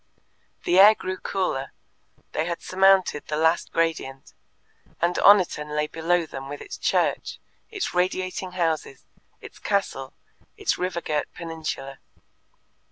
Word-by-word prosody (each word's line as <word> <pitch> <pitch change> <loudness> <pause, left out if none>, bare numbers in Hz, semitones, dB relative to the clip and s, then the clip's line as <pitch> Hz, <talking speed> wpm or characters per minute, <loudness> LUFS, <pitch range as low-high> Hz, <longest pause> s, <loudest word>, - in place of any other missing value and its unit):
The 180 +2 +3
air 210 +3 +9
grew 185 -1 -5
cooler; 160 -9 -2 0.6
they 155 - -1
had 170 -1 -4
surmounted 190 -5 +3
the 150 - -2
last 160 +2 +2
gradient, 160 -5 -2 0.7
and 170 +1 +2
Oniton 170 -7 +4
lay 150 0 +1
below 165 +2 0
them 135 -3 -8
with 145 - -6
its - - -9
church, - - 0 0.3
its 410 -4 -3
radiating 185 +1 -1
houses, 160 -6 -2 0.4
its - - -12
castle, 195 -10 -2 0.4
its - - -1
river 180 -1 -2
girt 150 -2 -2
peninsula. 160 -5 -5
170 Hz, 125 wpm, -25 LUFS, 150-185 Hz, 0.7 s, air